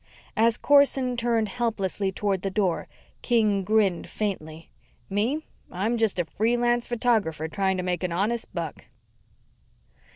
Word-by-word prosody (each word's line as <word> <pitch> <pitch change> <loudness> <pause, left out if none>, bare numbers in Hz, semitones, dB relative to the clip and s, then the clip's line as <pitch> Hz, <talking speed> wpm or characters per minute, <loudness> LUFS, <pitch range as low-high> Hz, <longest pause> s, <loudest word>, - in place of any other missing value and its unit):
As 230 +1 +3
Corson 275 -3 +4
turned 230 -2 +1
helplessly 200 -4 -1
toward 195 -1 -1
the 195 - -2
door, 190 -3 0 0.3
King 215 -5 +2
grinned 200 -3 +1
faintly. 165 -6 -4 0.4
"Me, 240 +11 0 0.3
I'm 205 +6 -1
just 225 -4 +1
a 175 - +1
free 225 +8 0
lance 240 0 +1
photographer 220 -10 0
trying 190 +2 0
to 180 - -2
make 180 -1 -1
an 180 -2 -2
honest 215 +7 -1
buck." 165 -4 -5
210 Hz, 135 wpm, -26 LUFS, 185-235 Hz, 0.4 s, Corson